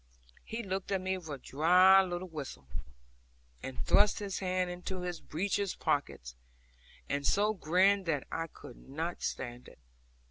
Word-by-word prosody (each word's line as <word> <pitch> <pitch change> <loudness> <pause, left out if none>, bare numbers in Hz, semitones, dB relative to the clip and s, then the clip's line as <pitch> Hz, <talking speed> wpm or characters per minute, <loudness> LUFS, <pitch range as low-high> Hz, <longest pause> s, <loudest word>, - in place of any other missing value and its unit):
He 230 +1 -5
looked 190 0 -3
at 195 - +2
me 190 +1 -1
with 165 -3 -11
a 145 - -4
dry 180 +8 +6
little 180 0 -3
whistle, 145 - -7 1.0
and 130 -1 -7
thrust 205 0 +5
his 200 -3 -3
hands 185 -1 0
into 180 +1 -5
his 180 -1 -4
breeches 195 +4 -1
pockets, 60 0 -2 0.7
and 140 0 -1
so 210 +7 +3
grinned 190 +2 +3
that 150 -4 0
I 165 0 -2
could 125 - -13
not 165 +5 -3
stand 120 -1 -4
it. - - -15
180 Hz, 150 wpm, -32 LUFS, 155-190 Hz, 1.0 s, dry